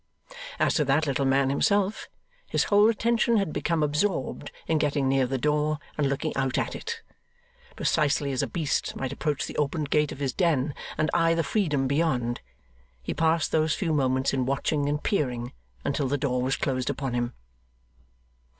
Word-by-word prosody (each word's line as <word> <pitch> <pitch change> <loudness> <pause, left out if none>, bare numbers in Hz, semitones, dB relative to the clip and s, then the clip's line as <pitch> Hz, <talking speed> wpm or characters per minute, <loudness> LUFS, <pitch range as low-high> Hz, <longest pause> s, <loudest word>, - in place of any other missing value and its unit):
As - - +2
to 150 - +2
that 140 +4 +2
little 140 -1 0
man 135 0 +3
himself, 200 +7 +1 0.4
his - - +1
whole 205 +1 +5
attention 230 +1 +2
had 195 -7 0
become 165 -2 0
absorbed 150 +6 -1
in 160 -1 +1
getting 145 -2 +1
near 135 -1 +2
the 135 +1 -1
door 150 +2 +1 0.2
and 145 -2 +1
looking 140 - -2
out 135 -1 0
at - - -1
it. - - -6 0.7
Precisely 145 -2 +1
as 130 - 0
a - - -1
beast 160 -5 -1
might 130 0 -3
approach 145 0 -1
the - - -8
opened 150 0 -1
gate 150 -1 +2
of - - -7
his 135 -2 -2
den 155 -6 +1 0.2
and 155 - +1
eye 165 -1 +3
the 165 - +1
freedom 150 -11 0
beyond, 130 -5 0 0.6
he - - -3
passed 165 -1 +1
those 155 -1 +2
few 165 -4 -1
moments 130 -2 +1
in 130 -2 0
watching 145 +1 0
and 150 +1 -2
peering, 125 - -1 0.3
until 140 0 0
the 145 +2 0
door 125 -3 0
was 130 +1 +1
closed 130 -1 -1
upon 135 -2 -3
him. 120 0 -1
145 Hz, 180 wpm, -26 LUFS, 135-160 Hz, 0.7 s, whole